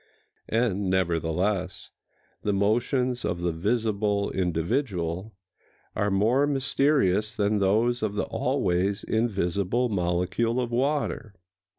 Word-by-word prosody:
And, 105 Hz, -4 st, 0 dB
nevertheless, 90 Hz, +1 st, -1 dB, 0.5 s
the 105 Hz, -, 0 dB
motions 120 Hz, +5 st, +1 dB
of 85 Hz, -, -2 dB
the 85 Hz, -1 st, 0 dB
visible 105 Hz, +2 st, 0 dB
individual 90 Hz, -, -2 dB, 0.6 s
are 105 Hz, -1 st, +1 dB
more 115 Hz, +9 st, +2 dB
mysterious 135 Hz, -7 st, +1 dB
than 105 Hz, 0 st, +1 dB
those 110 Hz, +5 st, +2 dB
of 105 Hz, -2 st, -2 dB
the -, -, 0 dB
always 100 Hz, -7 st, 0 dB
invisible 100 Hz, +1 st, 0 dB
molecule 90 Hz, +5 st, 0 dB
of 120 Hz, -1 st, -2 dB
water. 130 Hz, -4 st, -1 dB
105 Hz, 100 wpm, -26 LUFS, 95-120 Hz, 0.6 s, more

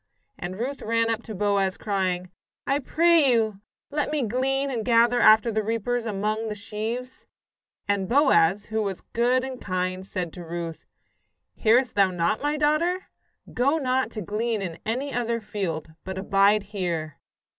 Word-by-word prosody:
And 185 Hz, +1 st, -5 dB
Ruth 260 Hz, +5 st, -4 dB
ran 230 Hz, +1 st, +1 dB
up 225 Hz, 0 st, -2 dB
to 220 Hz, -, -7 dB
Boaz, 200 Hz, -1 st, +1 dB
crying: 185 Hz, -3 st, -2 dB, 0.3 s
"I 275 Hz, +1 st, +1 dB
pray 320 Hz, 0 st, +4 dB
you, 220 Hz, -4 st, +1 dB, 0.3 s
let 295 Hz, 0 st, -1 dB
me 300 Hz, -3 st, 0 dB
glean 270 Hz, +4 st, 0 dB
and 230 Hz, -4 st, -2 dB
gather 235 Hz, +1 st, +4 dB
after 220 Hz, +1 st, +6 dB
the 215 Hz, 0 st, 0 dB
reapers 230 Hz, +2 st, -1 dB
among 215 Hz, +2 st, -1 dB
the 210 Hz, -, -3 dB
sheaves." 225 Hz, +4 st, -5 dB, 0.6 s
And 200 Hz, -2 st, 0 dB
Boaz, 205 Hz, -, +4 dB
who 220 Hz, 0 st, -2 dB
was 195 Hz, -3 st, -3 dB
good 245 Hz, +2 st, +1 dB
and 260 Hz, -1 st, -6 dB
kind, 185 Hz, 0 st, -2 dB
said 180 Hz, -3 st, -4 dB
to 175 Hz, -, -8 dB
Ruth: 170 Hz, -1 st, -6 dB, 0.7 s
"Hearest 240 Hz, +2 st, +3 dB
thou 195 Hz, -2 st, +4 dB
not, 175 Hz, +3 st, 0 dB
my 295 Hz, +1 st, 0 dB
daughter? 320 Hz, +5 st, +1 dB, 0.4 s
Go 275 Hz, +6 st, +2 dB
not 260 Hz, -3 st, 0 dB
to 215 Hz, -, -4 dB
glean 220 Hz, +4 st, -1 dB
in 170 Hz, -3 st, -5 dB
any 265 Hz, +5 st, -2 dB
other 235 Hz, -1 st, -1 dB
field, 190 Hz, -8 st, -4 dB
but 190 Hz, 0 st, -6 dB
abide 200 Hz, +2 st, +3 dB
here." 175 Hz, -6 st, -4 dB
220 Hz, 160 wpm, -25 LUFS, 195-250 Hz, 0.7 s, after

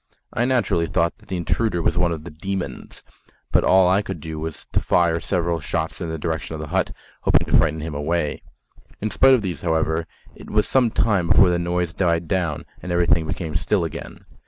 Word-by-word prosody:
I 120 Hz, -, +1 dB
naturally 120 Hz, -10 st, +1 dB
thought 85 Hz, 0 st, 0 dB
that -, -, -21 dB
the 95 Hz, -, -2 dB
intruder 90 Hz, +2 st, 0 dB
was 85 Hz, -, +1 dB
one 90 Hz, -1 st, +2 dB
of 80 Hz, -2 st, -4 dB
the 90 Hz, -, -9 dB
"demons," 95 Hz, +4 st, -5 dB, 0.5 s
but -, -, +3 dB
all 95 Hz, -1 st, +5 dB
I 95 Hz, +3 st, +3 dB
could 95 Hz, -5 st, -6 dB
do 80 Hz, 0 st, -6 dB
was 80 Hz, 0 st, -6 dB
to -, -, +2 dB
fire 85 Hz, -1 st, +2 dB
several 85 Hz, -2 st, -1 dB
shots 80 Hz, +3 st, -3 dB
in 85 Hz, -, -3 dB
the 80 Hz, -, -3 dB
direction 80 Hz, 0 st, -3 dB
of -, -, -6 dB
the 75 Hz, -1 st, -6 dB
hut, -, -, +1 dB, 0.3 s
hoping -, -, +3 dB
to -, -, +1 dB
frighten 80 Hz, 0 st, +3 dB
him 80 Hz, 0 st, -5 dB
away. 75 Hz, +1 st, -1 dB, 0.6 s
In 110 Hz, +1 st, -2 dB
spite 135 Hz, 0 st, +6 dB
of 115 Hz, -, -1 dB
these, 90 Hz, -3 st, -4 dB
however, 80 Hz, -1 st, 0 dB, 0.3 s
it -, -, -13 dB
was 105 Hz, 0 st, +2 dB
some 130 Hz, -3 st, +3 dB
time 100 Hz, -6 st, +1 dB
before 90 Hz, +1 st, +6 dB
the 85 Hz, -, +1 dB
noise 85 Hz, -1 st, -1 dB
died 85 Hz, -2 st, 0 dB
down 85 Hz, -5 st, -1 dB, 0.2 s
and 90 Hz, -, -5 dB
everything 85 Hz, -2 st, +2 dB
became 80 Hz, 0 st, -4 dB
still 90 Hz, +4 st, +1 dB
again. 80 Hz, -, -7 dB
85 Hz, 210 wpm, -22 LUFS, 80-95 Hz, 0.6 s, spite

